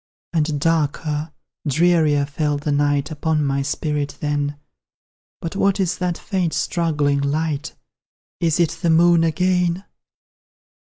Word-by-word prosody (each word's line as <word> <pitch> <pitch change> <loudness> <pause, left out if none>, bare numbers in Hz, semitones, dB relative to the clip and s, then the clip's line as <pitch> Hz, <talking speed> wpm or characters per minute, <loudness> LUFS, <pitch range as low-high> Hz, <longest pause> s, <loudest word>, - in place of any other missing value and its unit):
And 155 -2 0
darker, 155 0 0 0.4
drearier 155 -1 +3
fell 145 +1 -1
the 150 +1 -2
night 145 +1 +1
Upon 155 0 0
my 140 0 0
spirit 145 +1 -2
then; 145 -1 -1 0.8
But 165 +3 -5
what 200 0 +2
is 185 -3 0
that 180 -2 -1
faint 185 -5 -2
struggling 150 -5 0
light? 150 +1 -2 0.6
Is 165 -1 +1
it 170 -2 +3
the 170 - +1
Moon 170 +1 +5
again? 180 +2 +1
155 Hz, 120 wpm, -21 LUFS, 145-170 Hz, 0.8 s, Moon